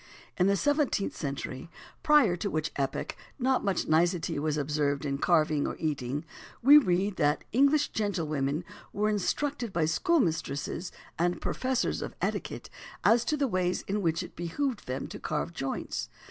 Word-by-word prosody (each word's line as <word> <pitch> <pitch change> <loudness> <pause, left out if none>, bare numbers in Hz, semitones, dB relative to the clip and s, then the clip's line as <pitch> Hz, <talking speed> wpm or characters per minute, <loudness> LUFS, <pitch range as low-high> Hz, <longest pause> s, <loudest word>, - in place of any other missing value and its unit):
In 180 - +3
the 200 - +4
seventeenth 290 -5 +1
century 140 -1 -5 0.3
prior 290 -12 +5
to 200 +4 -3
which 155 -3 -2
epoch 135 -1 -2 0.2
not 260 -1 +1
much 195 -3 0
nicety 170 -1 +2
was 150 0 0
observed 145 -1 0
in 140 -1 -2
carving, 155 -3 +2
or - - -3
eating 145 -1 -2 0.4
we 290 +4 +10
read 190 -4 0
that 150 -1 +2
"English 280 +4 +4
gentlewomen 155 -7 -1 0.3
were 210 +1 +1
instructed 240 +4 -1
by 170 -3 +1
schoolmistresses 165 - 0 0.3
and 175 +1 +1
professors 260 -1 -1
of - - -6
etiquette - - -3 0.4
as 230 +1 +5
to 300 +5 0
the 280 -1 +1
ways 185 -4 0
in 205 +1 -1
which 165 -2 0
it - - -11
behoved 230 - -3
them 130 +1 -3
to - - -8
carve 155 +2 -2
joints. 135 -4 -3
175 Hz, 155 wpm, -29 LUFS, 150-230 Hz, 0.4 s, we